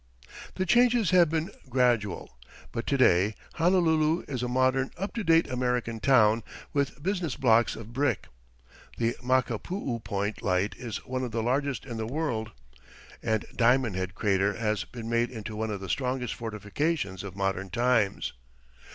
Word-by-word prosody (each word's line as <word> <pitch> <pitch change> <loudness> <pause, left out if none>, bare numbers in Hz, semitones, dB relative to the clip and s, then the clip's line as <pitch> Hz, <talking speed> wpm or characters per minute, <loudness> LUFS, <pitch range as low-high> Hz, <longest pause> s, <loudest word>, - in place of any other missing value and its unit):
The 185 - -1
changes 235 -1 +4
have 175 -3 +6
been 160 +1 -1 0.2
gradual, 120 - +1 0.4
but 115 - -4
to 140 - +2
day 100 -4 +4 0.2
Honolulu 165 -2 +3
is 130 -4 -3
a 125 - -1
modern, 130 +1 +2
up 195 +3 -4
to 230 - -3
date 165 -2 +4
American 125 -3 -1
town, 115 -4 +4 0.3
with 140 0 -1
business 180 -6 -1
blocks 115 -2 +3
of 115 +1 -10
brick. 130 -4 0 0.7
The 115 +1 0
Makapuu 130 - -1
Point 100 +1 -2
Light 95 +2 +1
is 120 -4 -6
one 130 0 -3
of 125 - -2
the 115 0 -2
largest 135 +1 0
in 120 -4 -6
the 110 0 -3
world, 120 -6 -2 0.7
and 110 -2 0
Diamond 120 -3 +3
Head 95 0 -3
crater 100 0 +1
has 105 -4 -1
been 115 -2 -8
made 115 +1 +1
into 110 -3 -7
one 110 +1 -2
of 100 -2 -4
the 95 - -6
strongest 125 +2 -1
fortifications 105 - -2
of 100 -2 -7
modern 95 -1 -1
times. 120 -2 +1
120 Hz, 160 wpm, -28 LUFS, 110-140 Hz, 0.7 s, have